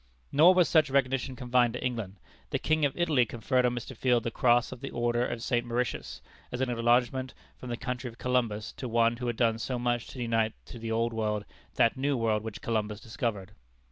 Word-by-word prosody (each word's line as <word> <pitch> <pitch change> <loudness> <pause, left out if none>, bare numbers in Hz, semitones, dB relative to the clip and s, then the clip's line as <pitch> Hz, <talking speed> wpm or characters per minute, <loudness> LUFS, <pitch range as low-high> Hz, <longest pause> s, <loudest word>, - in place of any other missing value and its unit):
Nor 170 +6 +7
was 180 -2 +5
such 155 -3 +4
recognition 135 -1 0
confined 120 -1 +2
to 125 - -4
England. 115 -6 -3 0.3
The - - 0
King 155 -1 +1
of 140 - -2
Italy 155 -7 +3
conferred 125 +2 +1
on 120 - -1
Mr. 125 +2 -6
Field 120 0 +2
the 115 - -2
cross 120 +1 +3
of 130 -1 -9
the 135 - -5
order 120 0 0
of 120 -2 -3
St. 120 -2 +1
Mauritius, 120 0 -3 0.3
as 125 - -4
an 130 -1 0
acknowledgment 120 +2 +1 0.2
from 125 - -9
the 120 - -3
country 125 0 -4
of 115 -1 -10
Columbus 115 -5 -1
to 125 - -5
one 115 0 +3
who 125 0 -4
had 120 -1 -2
done 115 -2 +2
so 125 +2 -2
much 120 -1 -1
to 130 - -9
unite 115 -2 +1
to 120 - -10
the 115 0 -4
Old 115 +1 0
World 105 -2 -1 0.3
that 115 - +3
New 140 +1 0
World 110 -2 +1
which 110 -2 -7
Columbus 105 -2 -1
discovered. 110 -4 -4
120 Hz, 215 wpm, -29 LUFS, 115-130 Hz, 0.3 s, Nor